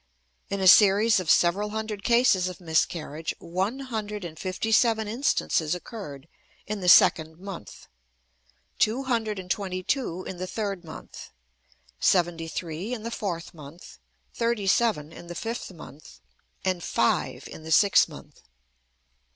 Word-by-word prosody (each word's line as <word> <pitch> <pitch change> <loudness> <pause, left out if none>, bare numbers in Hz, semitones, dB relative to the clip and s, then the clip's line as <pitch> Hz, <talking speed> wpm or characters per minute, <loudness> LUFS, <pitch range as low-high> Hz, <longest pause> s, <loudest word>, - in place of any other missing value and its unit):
In 200 - -2
a 190 - +2
series 205 +3 +6
of 180 -4 -4
several 195 +5 +3
hundred 215 -1 -4
cases 235 -6 +3
of 180 - -9
miscarriage, 160 -2 -1
one 185 +8 -2
hundred 210 -6 -5
and 160 -2 -8
fifty 190 +4 -3
seven 220 -1 +3
instances 210 - 0
occurred 175 - -9 0.4
in 210 0 -4
the 180 -2 +1
second 160 -2 +5
month, 185 - -9 0.9
two 235 +5 +2
hundred 225 -5 -1
and 180 -1 -6
twenty 185 -2 -2
two 185 - -2
in 185 - -7
the 185 +1 -4
third 200 -2 -4
month, 160 -1 -10 0.7
seventy 170 -3 +2
three 170 +8 -4
in 220 - -9
the 230 - -4
fourth 175 -7 -4
month, 155 +2 -13 0.3
thirty 230 -3 -1
seven 195 -7 +1
in 175 - -11
the 175 - -7
fifth 230 0 -5
month, 145 - -13 0.5
and 185 -2 0
five - - 0
in - - -10
the 160 +1 -8
sixth 200 +5 +5
month. - - -13
190 Hz, 145 wpm, -26 LUFS, 170-220 Hz, 0.9 s, series